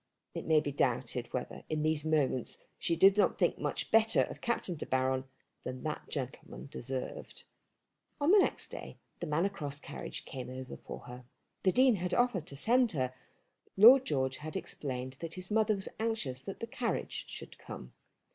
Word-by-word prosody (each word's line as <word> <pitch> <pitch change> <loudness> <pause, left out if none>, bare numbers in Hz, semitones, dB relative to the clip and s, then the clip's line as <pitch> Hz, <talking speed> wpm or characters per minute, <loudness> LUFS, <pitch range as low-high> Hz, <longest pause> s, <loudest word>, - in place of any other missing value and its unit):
It - - -5
may 160 -1 +6
be 145 -1 -2
doubted 125 -2 0
whether 125 - -4
in 155 -1 0
these 155 -1 +2
moments 150 -6 +1 0.2
she 170 - +1
did 195 +4 +6
not 205 - +3
think - - +2
much - - -2
better 225 0 +5
of - - -7
Captain 235 -6 0
De 155 - -6
Baron 130 0 +1 0.4
than 130 0 -5
that 155 - -4
gentleman 135 0 -5
deserved. 130 +1 -5 0.8
On 295 +4 +4
the 410 - +8
next - - +1
day - - -8 0.2
the - - -3
Manor 160 +5 +2
Cross 145 -7 -6
carriage - - -7
came 130 -4 -6
over 130 0 -6
for - - -8
her. 125 0 -10 0.4
The 185 - +4
Dean 255 0 +5
had 180 0 -1
offered 240 -10 +2
to 140 - -8
send 240 - +3
her, 130 -4 -1 0.5
but - - -33
Lord 255 +3 +11
George 130 - 0
had 155 +1 -7
explained 130 -2 -5
that 165 -1 -5
his 185 +2 -6
mother 215 0 +3
was 195 - -5
anxious 215 - -1
that 195 - -7
the - - -1
carriage 230 +1 -2
should - - -9
come. - - -9
155 Hz, 185 wpm, -32 LUFS, 130-210 Hz, 0.8 s, Lord